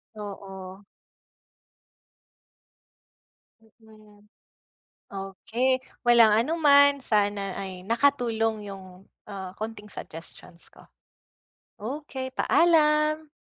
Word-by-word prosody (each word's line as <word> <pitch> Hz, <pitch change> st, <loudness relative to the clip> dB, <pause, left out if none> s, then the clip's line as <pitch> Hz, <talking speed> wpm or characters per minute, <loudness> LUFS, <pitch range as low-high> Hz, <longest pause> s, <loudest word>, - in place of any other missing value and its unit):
Oo. 195 Hz, -2 st, -9 dB, 2.8 s
Mm. 215 Hz, -2 st, -21 dB, 0.9 s
Okey 225 Hz, +7 st, -2 dB, 0.2 s
walang 235 Hz, -3 st, +6 dB
anuman. 285 Hz, +1 st, +4 dB
Sana 205 Hz, -4 st, 0 dB
ay 190 Hz, -2 st, -6 dB
nakatulong 225 Hz, -4 st, +1 dB
'yung, 190 Hz, -1 st, -12 dB, 0.2 s
ah, 190 Hz, -2 st, -8 dB
konting 215 Hz, -1 st, -7 dB
suggestions 165 Hz, -2 st, -10 dB
ko. -, -, -19 dB, 0.9 s
Okey 260 Hz, +2 st, -6 dB
paalam. 305 Hz, -1 st, +3 dB
220 Hz, 65 wpm, -26 LUFS, 195-265 Hz, 2.8 s, walang